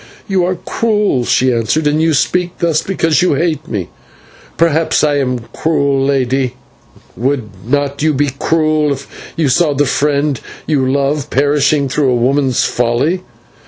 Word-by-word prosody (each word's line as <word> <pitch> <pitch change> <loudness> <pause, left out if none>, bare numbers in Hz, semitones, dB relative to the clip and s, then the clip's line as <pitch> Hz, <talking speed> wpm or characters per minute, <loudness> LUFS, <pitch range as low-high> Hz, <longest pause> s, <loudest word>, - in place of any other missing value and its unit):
"You 190 -3 +1
are 185 +1 -1
cruel," 210 - 0
she 130 +1 +2
answered, 115 +7 0
"and 150 +1 +2
you 160 -1 +2
speak 180 +5 0
thus 165 -3 +1
because 165 -4 +1
you 180 -5 +2
hate 155 0 -1
me." 100 - -4 0.7
"Perhaps 165 -1 +2
I 145 -1 +2
am 125 -3 -1
cruel, 140 -4 +1
lady. 130 -2 0 0.6
Would 125 -2 -2
not 140 +3 -1
you 155 +1 +3
be 145 -1 0
cruel 155 -2 +1
if 135 0 -11
you 160 -3 +1
saw 145 +2 +2
the 145 +1 +2
friend 145 -1 0 0.2
you 135 -4 +1
love 140 +1 -1
perishing 145 +1 +2
through 135 +1 +1
a 125 - +2
woman's 130 +1 +1
folly?" 125 +10 0
145 Hz, 155 wpm, -15 LUFS, 135-160 Hz, 0.7 s, you